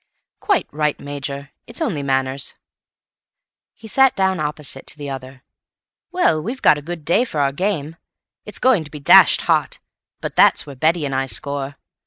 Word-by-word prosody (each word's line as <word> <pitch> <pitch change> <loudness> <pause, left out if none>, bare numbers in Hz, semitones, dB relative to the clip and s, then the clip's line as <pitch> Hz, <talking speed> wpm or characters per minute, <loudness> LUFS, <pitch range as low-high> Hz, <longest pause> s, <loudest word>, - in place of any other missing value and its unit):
"Quite 400 -4 +1
right, 150 0 -1
Major; 140 0 -6 0.2
it's 235 - -6
only 215 - -1
manners." 135 0 -1 1.2
He 225 - -13
sat 265 +4 +4
down 190 -2 +1
opposite 150 -3 -5
to - - -6
the 145 -1 -6
other. 130 0 -9 0.7
"Well, 170 - +2
we've 240 - -6
got 150 - +5
a - - -10
good 165 0 -7
day 195 +9 +3
for 195 -12 -4
our 140 -1 +2
game. 165 -2 -2 0.5
It's - - -7
going 255 -10 +3
to 150 - -11
be 150 - -9
dashed 140 - +6
hot, - - 0 0.4
but - - -5
that's - - +5
where 140 - -10
Betty 160 +4 +1
and 135 - -3
I 135 0 -1
score. 140 +4 -2
150 Hz, 175 wpm, -20 LUFS, 140-185 Hz, 1.2 s, dashed